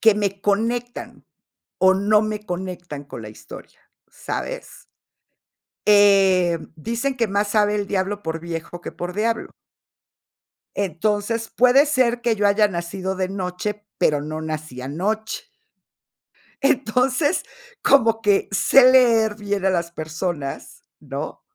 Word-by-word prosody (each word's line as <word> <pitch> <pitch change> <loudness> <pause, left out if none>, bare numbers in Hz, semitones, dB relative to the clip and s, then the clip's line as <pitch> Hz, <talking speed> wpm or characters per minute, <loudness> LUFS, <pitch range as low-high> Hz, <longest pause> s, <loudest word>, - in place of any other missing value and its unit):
que 220 -2 +6
me 200 -1 -2
conectan, 230 +4 -2 0.5
o 190 0 +6
no 210 +2 +3
me 215 -1 -4
conectan 175 -5 -6
con 120 - -9
la 105 - -8
historia, 105 - -13 0.3
¿sabes? - - -6 1.0
Eh, 195 -4 +5 0.2
dicen: 235 - -2
"Que 230 -2 0
más 205 +1 0
sabe 210 0 +2
el 205 -1 -2
diablo 200 +1 -2
por 160 0 -3
viejo 170 +1 -6
que - - -7
por 175 +1 -6
diablo". 225 +3 -1 1.2
Entonces, 205 +4 -1
puede 255 +4 +5
ser 250 -4 +1
que 235 -2 +1
yo 205 0 +2
haya 210 +1 +4
nacido 185 +1 -4
de 185 0 -2
noche, 200 +2 -4
pero 145 -1 +2
no 155 +1 -5
nací 155 -5 -6
anoche. 210 +11 -3 1.2
Entonces, 265 +4 +1 0.4
como 225 -5 +4
que 205 -2 +2
sé 255 +6 +6
leer 225 -4 +4
bien 205 -2 -3
a - - +4
las 170 -2 -1
personas, 155 -2 -5 0.2
¿no? - - -6
205 Hz, 130 wpm, -22 LUFS, 175-225 Hz, 1.2 s, que